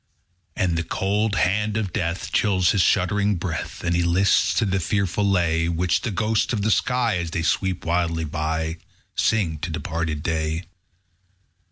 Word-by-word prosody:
2. -, -, +1 dB
And 85 Hz, -3 st, +1 dB
the -, -, -1 dB
cold 100 Hz, +4 st, 0 dB
hand 105 Hz, +4 st, +1 dB
of 100 Hz, -5 st, -2 dB
death 85 Hz, +1 st, -2 dB
Chills 95 Hz, -4 st, +3 dB
his 100 Hz, -, +2 dB
shuddering 100 Hz, +4 st, +2 dB
breath, 85 Hz, -2 st, -4 dB
As 85 Hz, -, 0 dB
he 85 Hz, -, +2 dB
lists 90 Hz, +3 st, +3 dB
to 115 Hz, -, +2 dB
the 95 Hz, -1 st, 0 dB
fearful 100 Hz, +2 st, 0 dB
lay 85 Hz, -4 st, +2 dB
Which 85 Hz, +1 st, +1 dB
the 120 Hz, -, -2 dB
ghosts 110 Hz, +3 st, 0 dB
of 105 Hz, -3 st, -1 dB
the 110 Hz, -, +2 dB
sky, 120 Hz, -3 st, +1 dB
_10 -, -, -1 dB
As 85 Hz, -, -4 dB
they 80 Hz, 0 st, -2 dB
sweep 95 Hz, +2 st, 0 dB
wildly 85 Hz, -1 st, 0 dB
by, 80 Hz, +2 st, -2 dB, 0.4 s
Sing 90 Hz, -9 st, +1 dB
to 85 Hz, -, -4 dB
departed 80 Hz, -1 st, -3 dB
day. 80 Hz, 0 st, -1 dB
90 Hz, 175 wpm, -23 LUFS, 80-100 Hz, 0.4 s, Chills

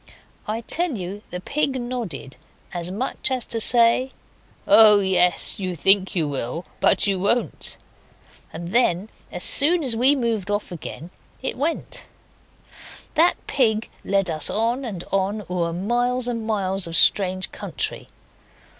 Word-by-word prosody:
I 220 Hz, +2 st, -3 dB
tell 330 Hz, +2 st, -1 dB
you 190 Hz, +2 st, -6 dB
the 180 Hz, -, -5 dB
pig 275 Hz, +5 st, 0 dB
nodded 230 Hz, -, -6 dB, 0.4 s
as 175 Hz, -1 st, -3 dB
much 220 Hz, +9 st, -2 dB
as 255 Hz, -2 st, -1 dB
to 230 Hz, -1 st, -3 dB
say 240 Hz, +3 st, +3 dB, 0.5 s
'Oh, 215 Hz, -2 st, +7 dB
yes. 180 Hz, -2 st, +2 dB
You 185 Hz, -2 st, -3 dB
think 195 Hz, +5 st, +2 dB
you 165 Hz, -4 st, +1 dB
will, 140 Hz, +4 st, -4 dB
but -, -, +3 dB
you 195 Hz, -2 st, 0 dB
won't!' 230 Hz, +6 st, 0 dB, 0.7 s
and 170 Hz, +1 st, -7 dB
then 205 Hz, -3 st, +1 dB, 0.2 s
as 180 Hz, -, 0 dB
soon 325 Hz, +4 st, +4 dB
as 250 Hz, -4 st, -1 dB
we 260 Hz, +5 st, +5 dB
moved 230 Hz, -7 st, -2 dB
again 180 Hz, -4 st, -5 dB
off -, -, -33 dB
it -, -, -2 dB
went. 305 Hz, +6 st, -3 dB, 1.1 s
That 330 Hz, +3 st, +4 dB
pig 225 Hz, -4 st, 0 dB
led 195 Hz, -3 st, +1 dB
us 155 Hz, -1 st, +2 dB
on 235 Hz, +5 st, -1 dB
and 190 Hz, -7 st, -6 dB
on, 195 Hz, +2 st, -1 dB
o'er 175 Hz, -2 st, -2 dB
miles 240 Hz, +7 st, -1 dB
and 230 Hz, -2 st, -3 dB
miles 195 Hz, -4 st, -1 dB
of 165 Hz, -, -4 dB
strange 185 Hz, -2 st, +3 dB
country. -, -, -4 dB
205 Hz, 145 wpm, -22 LUFS, 180-245 Hz, 1.1 s, Oh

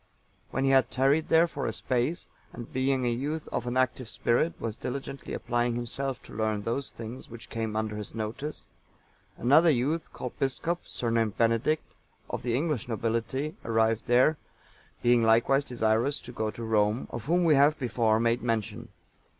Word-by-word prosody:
When 135 Hz, -, -1 dB
he 135 Hz, -, +3 dB
had 130 Hz, -2 st, +4 dB
tarried 135 Hz, +5 st, +2 dB
there 165 Hz, +1 st, +6 dB
for -, -, -4 dB
a -, -, 0 dB
space, 130 Hz, +6 st, -1 dB, 0.3 s
and, 120 Hz, -, -9 dB
being 130 Hz, 0 st, +1 dB
a 120 Hz, -, +2 dB
youth 145 Hz, +6 st, -3 dB
of -, -, -3 dB
an 120 Hz, +1 st, -1 dB
active 130 Hz, -2 st, 0 dB
spirit, 120 Hz, +8 st, +1 dB
was 110 Hz, -2 st, -3 dB
diligently 135 Hz, +2 st, -6 dB
applying 120 Hz, 0 st, 0 dB
himself 125 Hz, +2 st, -3 dB
to -, -, -13 dB
learn 110 Hz, -1 st, -1 dB
those 130 Hz, +5 st, -2 dB
things 115 Hz, +3 st, -8 dB
which 115 Hz, 0 st, -11 dB
came 110 Hz, -1 st, -3 dB
under 110 Hz, -1 st, -1 dB
his 105 Hz, +1 st, -6 dB
notice, 115 Hz, +8 st, -4 dB, 0.7 s
another 150 Hz, +8 st, +5 dB
youth, 150 Hz, +4 st, 0 dB
called 125 Hz, -, -6 dB
Biscop, 165 Hz, +6 st, -1 dB
surnamed 115 Hz, -3 st, -1 dB
Benedict,(896) 115 Hz, +7 st, +2 dB, 0.5 s
of -, -, -2 dB
the 120 Hz, -1 st, -1 dB
English 145 Hz, -5 st, -1 dB
nobility, 115 Hz, +6 st, -2 dB
arrived 110 Hz, -1 st, +1 dB
there, 125 Hz, +6 st, +4 dB, 0.7 s
being 120 Hz, 0 st, +5 dB
likewise 115 Hz, +5 st, +4 dB
desirous 120 Hz, +2 st, +1 dB
to 125 Hz, -, -10 dB
go 110 Hz, -3 st, -2 dB
to 115 Hz, -, -7 dB
Rome, 110 Hz, +1 st, +1 dB
of 120 Hz, -1 st, -6 dB
whom 175 Hz, +4 st, +2 dB
we 165 Hz, -2 st, +5 dB
have 145 Hz, +2 st, +5 dB
before 115 Hz, -4 st, +1 dB
made 115 Hz, +1 st, +1 dB
mention. 115 Hz, 0 st, -2 dB
120 Hz, 170 wpm, -28 LUFS, 115-135 Hz, 0.7 s, there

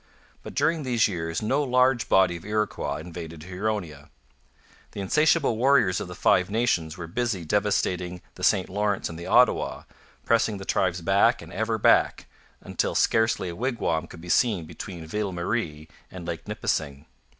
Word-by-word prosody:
But -, -, -10 dB
during 165 Hz, -1 st, +1 dB
these 125 Hz, -5 st, +2 dB
years 80 Hz, -2 st, -3 dB
no 135 Hz, +7 st, +1 dB
large 125 Hz, -2 st, +2 dB
body 95 Hz, -2 st, +4 dB
of 85 Hz, -, -9 dB
Iroquois 105 Hz, 0 st, -2 dB
invaded 80 Hz, -1 st, -8 dB
Huronia. 90 Hz, -5 st, -4 dB, 0.8 s
The -, -, -7 dB
insatiable 150 Hz, -, +2 dB
warriors 120 Hz, -7 st, +3 dB
of -, -, -5 dB
the 90 Hz, -, -8 dB
Five 90 Hz, +1 st, +3 dB
Nations 95 Hz, -7 st, 0 dB
were 90 Hz, -, -6 dB
busy 100 Hz, 0 st, -2 dB
devastating 90 Hz, -2 st, -1 dB
the 90 Hz, -, -11 dB
St 95 Hz, -1 st, +3 dB
Lawrence 100 Hz, +1 st, -1 dB
and 85 Hz, 0 st, -8 dB
the 85 Hz, -, -7 dB
Ottawa, -, -, +3 dB, 0.4 s
pressing 115 Hz, -2 st, +2 dB
the 95 Hz, -, -8 dB
tribes 90 Hz, -2 st, 0 dB
back 100 Hz, +7 st, +3 dB
and -, -, -11 dB
ever 110 Hz, +1 st, -1 dB
back, 105 Hz, -, +3 dB, 0.4 s
until -, -, -2 dB
scarcely 110 Hz, -5 st, +2 dB
a 85 Hz, -, -6 dB
wigwam 105 Hz, -8 st, -1 dB
could 85 Hz, -, -12 dB
be 90 Hz, -, -11 dB
seen 105 Hz, -6 st, +2 dB
between 85 Hz, +1 st, -8 dB
Ville 100 Hz, +3 st, -3 dB
Marie 85 Hz, -4 st, -3 dB, 0.2 s
and 90 Hz, -2 st, -9 dB
Lake 85 Hz, -2 st, -5 dB
Nipissing. 70 Hz, -1 st, -2 dB
95 Hz, 160 wpm, -25 LUFS, 85-110 Hz, 0.8 s, body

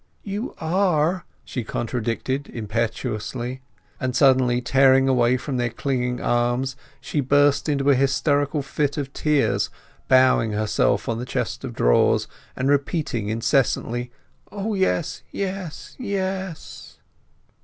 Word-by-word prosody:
"You 205 Hz, +4 st, -4 dB
are!" 175 Hz, 0 st, +1 dB, 0.2 s
she 125 Hz, -, -4 dB
contradicted 120 Hz, +4 st, -3 dB
impetuously. 115 Hz, +3 st, -3 dB, 0.4 s
And 130 Hz, -1 st, -2 dB
suddenly 130 Hz, -2 st, +4 dB
tearing 135 Hz, +1 st, +4 dB
away 125 Hz, -1 st, +3 dB
from 130 Hz, +1 st, -4 dB
their 120 Hz, -1 st, 0 dB
clinging 125 Hz, -1 st, -2 dB
arms 120 Hz, +2 st, 0 dB, 0.2 s
she 150 Hz, -, -3 dB
burst 145 Hz, +2 st, +3 dB
into 140 Hz, -1 st, +2 dB
a -, -, +5 dB
hysterical 140 Hz, +2 st, +1 dB
fit 145 Hz, +1 st, -1 dB
of 140 Hz, -1 st, -4 dB
tears, 150 Hz, -2 st, +1 dB, 0.4 s
bowing 130 Hz, -4 st, +4 dB
herself 105 Hz, -1 st, +1 dB
on 115 Hz, -1 st, -1 dB
the 125 Hz, -, -4 dB
chest -, -, -3 dB
of -, -, -6 dB
drawers -, -, +3 dB, 0.3 s
and 130 Hz, -, -1 dB
repeating 140 Hz, -6 st, 0 dB
incessantly, 120 Hz, +1 st, 0 dB, 0.4 s
"O 210 Hz, +2 st, -3 dB
yes, 190 Hz, -4 st, 0 dB
yes, 190 Hz, -4 st, -5 dB
yes!" 190 Hz, -, -4 dB
135 Hz, 120 wpm, -23 LUFS, 120-150 Hz, 0.4 s, a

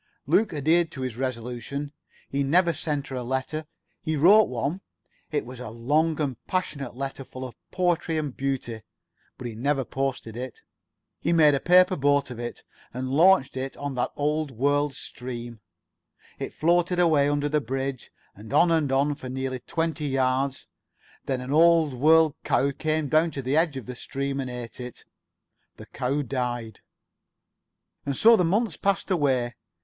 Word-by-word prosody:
Luke 220 Hz, -, +3 dB
adhered 160 Hz, +3 st, +2 dB
to 130 Hz, -, -6 dB
his 130 Hz, -3 st, -3 dB
resolution. 130 Hz, +3 st, -4 dB, 0.3 s
He 140 Hz, -, -1 dB
never 170 Hz, +5 st, +3 dB
sent 150 Hz, -3 st, -3 dB
her 135 Hz, -, -5 dB
a -, -, -3 dB
letter. 130 Hz, +5 st, -3 dB, 0.3 s
He 155 Hz, -, -1 dB
wrote 200 Hz, +9 st, +6 dB
one. 140 Hz, +10 st, -2 dB, 0.5 s
It 150 Hz, -2 st, -1 dB
was 125 Hz, 0 st, -9 dB
a 125 Hz, -, -6 dB
long 150 Hz, +8 st, +1 dB
and 135 Hz, -6 st, -2 dB
passionate 145 Hz, -9 st, -3 dB
letter, 135 Hz, +1 st, -5 dB
full 130 Hz, 0 st, -8 dB
of 125 Hz, -, -8 dB, 0.2 s
poetry 175 Hz, -3 st, 0 dB
and 150 Hz, -4 st, -3 dB
beauty. 130 Hz, -5 st, -3 dB, 0.6 s
But 125 Hz, -, -8 dB
he 120 Hz, -, -4 dB
never 135 Hz, +4 st, 0 dB
posted 130 Hz, -4 st, -3 dB
it. 125 Hz, +1 st, -7 dB, 0.6 s
He -, -, 0 dB
made 155 Hz, -3 st, +6 dB
a 140 Hz, -, +1 dB
paper 180 Hz, +4 st, +5 dB
boat 145 Hz, -2 st, +2 dB
of 120 Hz, -, -7 dB
it. 120 Hz, 0 st, -6 dB, 0.3 s
And 130 Hz, +1 st, -4 dB
launched 165 Hz, -1 st, +4 dB
it 135 Hz, +1 st, -4 dB
on 145 Hz, -1 st, -4 dB
that 125 Hz, -, -1 dB
old 150 Hz, +1 st, 0 dB
world 145 Hz, +3 st, +1 dB
stream. 120 Hz, -3 st, -7 dB, 0.8 s
It -, -, -4 dB
floated 175 Hz, +2 st, +2 dB
away 155 Hz, -5 st, +4 dB
under 145 Hz, 0 st, 0 dB
the 150 Hz, 0 st, +1 dB
bridge, 135 Hz, +1 st, -4 dB, 0.2 s
and 105 Hz, +2 st, -12 dB
on 170 Hz, 0 st, +4 dB
and 155 Hz, -4 st, +2 dB
on 140 Hz, +2 st, +2 dB
for 130 Hz, -2 st, -8 dB
nearly 130 Hz, 0 st, -3 dB
twenty 160 Hz, +3 st, -2 dB
yards. 135 Hz, 0 st, 0 dB, 0.6 s
Then 130 Hz, -2 st, -1 dB
an 130 Hz, +2 st, -4 dB
old 165 Hz, -2 st, +5 dB
world 155 Hz, +4 st, +5 dB
cow 140 Hz, +1 st, +2 dB
came 155 Hz, +1 st, -1 dB
down 155 Hz, +4 st, +3 dB
to 140 Hz, -3 st, -6 dB
the 130 Hz, +3 st, 0 dB
edge 160 Hz, -3 st, +2 dB
of 130 Hz, -, -7 dB
the 125 Hz, -, -6 dB
stream 140 Hz, +2 st, -4 dB
and 130 Hz, -2 st, -3 dB
ate 120 Hz, -2 st, -7 dB
it. 125 Hz, -1 st, -8 dB, 0.7 s
The -, -, -10 dB
cow 140 Hz, +4 st, -2 dB
died. 120 Hz, -3 st, -3 dB, 1.2 s
And 140 Hz, -2 st, -2 dB
so 230 Hz, +1 st, +7 dB
the 185 Hz, -, +2 dB
months 195 Hz, +1 st, +1 dB
passed 195 Hz, 0 st, 0 dB
away. 130 Hz, -8 st, +1 dB
140 Hz, 170 wpm, -26 LUFS, 130-155 Hz, 1.2 s, so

